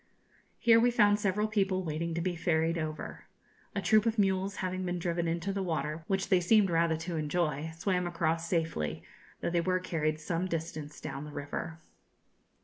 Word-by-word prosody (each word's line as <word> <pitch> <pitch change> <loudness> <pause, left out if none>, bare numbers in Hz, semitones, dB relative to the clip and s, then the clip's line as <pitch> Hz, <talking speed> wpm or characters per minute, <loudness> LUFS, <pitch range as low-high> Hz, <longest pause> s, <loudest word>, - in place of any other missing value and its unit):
Here 230 -1 +6
we 240 +2 +5
found 205 -3 +4
several 210 +1 +1
people 195 -3 +1
waiting 165 +1 -2
to 170 - -1
be 180 0 -1
ferried 165 0 +1
over. 155 -1 -5 0.5
A - - -1
troop 215 0 +4
of 230 0 0
mules 195 0 +1
having 185 0 -2
been 180 -1 -1
driven 170 0 -1
into 170 +4 -1
the 195 - -1
water, 160 -3 -2
which 195 0 0
they 185 -2 +5
seemed 195 +1 +4
rather 165 -1 +2
to 165 +1 -4
enjoy, 155 -1 -1
swam 180 0 0
across 165 -1 -1
safely, 160 - -1 0.4
though - - -1
they 170 -1 +2
were 185 +1 +1
carried 155 -4 -1
some 170 +3 -1
distance 160 -3 -4
down 140 - -5
the 150 - -8
river. 145 +3 -5
170 Hz, 180 wpm, -31 LUFS, 160-190 Hz, 0.5 s, Here